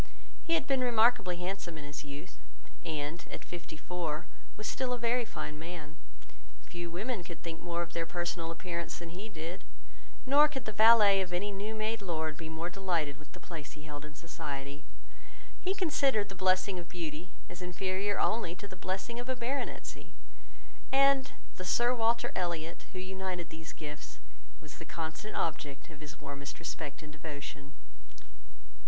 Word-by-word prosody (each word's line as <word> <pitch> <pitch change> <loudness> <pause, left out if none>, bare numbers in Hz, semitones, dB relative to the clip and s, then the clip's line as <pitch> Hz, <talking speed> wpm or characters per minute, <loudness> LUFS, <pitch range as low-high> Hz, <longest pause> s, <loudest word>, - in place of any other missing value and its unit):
He 330 - +3
had 315 -4 +2
been 270 -2 +3
remarkably 235 -6 +5
handsome 180 -2 -3
in 150 - -6
his 145 +1 -5
youth; 145 +4 -8 0.4
and, 155 +1 -2
at - - -6
fifty 170 -2 -6
four, 160 -2 -2 0.3
was 215 - -4
still 255 +2 +1
a - - 0
very 240 +1 +3
fine 150 -7 -4
man. 160 -2 -6 0.7
Few 175 -1 -5
women 200 +4 -1
could 170 -2 -8
think 165 -1 -4
more 170 0 0
of 170 - -8
their 165 -1 0
personal 175 -1 -1
appearance 170 0 -3
than 170 -1 -6
he 190 +6 -6
did, 170 -1 -5 0.6
nor 285 +3 +8
could 270 -5 -4
the 215 - -1
valet 215 -2 +9
of 180 -2 -2
any 195 +4 +1
new 205 +3 -2
made 220 +1 0
lord 160 -4 0
be 160 0 -6
more 160 +2 -2
delighted 175 -6 0
with 150 -1 -15
the - - -9
place 160 -4 -7
he 150 - -11
held 145 -1 -6
in 150 0 -9
society. 140 -2 -5 0.8
He 380 +1 +1
considered 275 - +3
the - - -5
blessing 185 0 +3
of 170 -1 -8
beauty 165 0 -4 0.2
as 175 - -8
inferior 190 +3 0
only 215 -7 +2
to 200 - -7
the 185 - -8
blessing 190 +6 -2
of 245 +1 -4
a 260 - +2
baronetcy; 250 +3 -3 0.8
and 275 0 +6 0.3
the 185 - -3
Sir 240 +7 +4
Walter 235 -1 +3
Elliot, 170 -2 -1
who - - -7
united 185 -2 -3
these 160 0 -6
gifts, 150 -1 -7 0.4
was - - -10
the - - -5
constant 165 +6 -4
object 145 -1 -1
of 150 - -11
his 155 +1 -8
warmest 140 0 -5
respect 155 -2 -4
and 150 -1 -9
devotion. 145 -2 -6
175 Hz, 170 wpm, -33 LUFS, 160-215 Hz, 0.8 s, valet